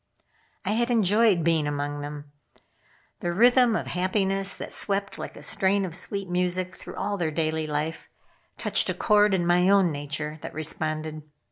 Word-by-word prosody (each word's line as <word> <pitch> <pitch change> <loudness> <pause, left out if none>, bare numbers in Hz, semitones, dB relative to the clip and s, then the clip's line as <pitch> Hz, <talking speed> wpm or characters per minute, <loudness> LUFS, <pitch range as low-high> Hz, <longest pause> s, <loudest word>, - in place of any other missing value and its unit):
I 195 - 0
had 235 +3 +1
enjoyed 215 -4 +3
being 160 -2 +2
among 145 0 -3
them. 145 0 -8 0.9
The 175 - -2
rhythm 245 +4 +5
of - - -2
happiness 195 +1 0
that - - -6
swept 200 -1 -1
like - - -7
a - - -11
strain 195 +1 +1
of 175 - -6
sweet 195 +3 -2
music 180 +1 -1
through - - -10
all 200 +1 -2
their 165 -2 0
daily 155 0 -1
life, 150 +2 -3 0.5
touched - - +1
a - - -1
chord 210 -2 +4
in 175 -2 0
my 180 +2 +4
own 195 -4 +4
nature 150 +1 -5
that - - -8
responded. 155 0 -3
180 Hz, 165 wpm, -26 LUFS, 155-200 Hz, 0.9 s, rhythm